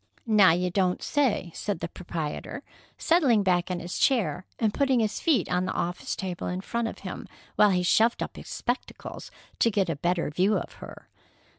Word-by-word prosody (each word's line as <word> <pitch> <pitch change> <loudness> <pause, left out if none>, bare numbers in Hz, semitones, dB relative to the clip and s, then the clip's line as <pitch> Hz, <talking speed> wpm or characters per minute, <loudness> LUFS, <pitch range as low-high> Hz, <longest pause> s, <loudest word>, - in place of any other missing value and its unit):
"Now, 210 -4 +6
you 180 +2 +1
don't 180 -1 +1
say!" 255 -11 +1
said 205 -5 -3
the 170 - -3
proprietor, 165 -4 -5 0.3
settling 275 - +3
back 180 -1 +1
in 180 -1 -2
his 175 0 -5
chair 220 -8 +1
and 220 -3 +1
putting 270 -3 +2
his 220 -2 0
feet 315 -7 +2
on 180 +1 0
the - - -2
office 175 +1 -2
table 185 -2 -4
in 180 +1 -3
front 235 +3 -2
of - - -6
him, - - -6 0.3
while 210 - +6
he 180 -2 +1
shoved 225 +6 +3
up - - -7
his - - -10
spectacles 245 +1 -4 0.3
to 230 - +4
get 195 -4 0
a - - -2
better 170 +1 -1
view 185 +7 +2
of - - -6
her. - - -10
190 Hz, 190 wpm, -27 LUFS, 180-230 Hz, 0.3 s, Now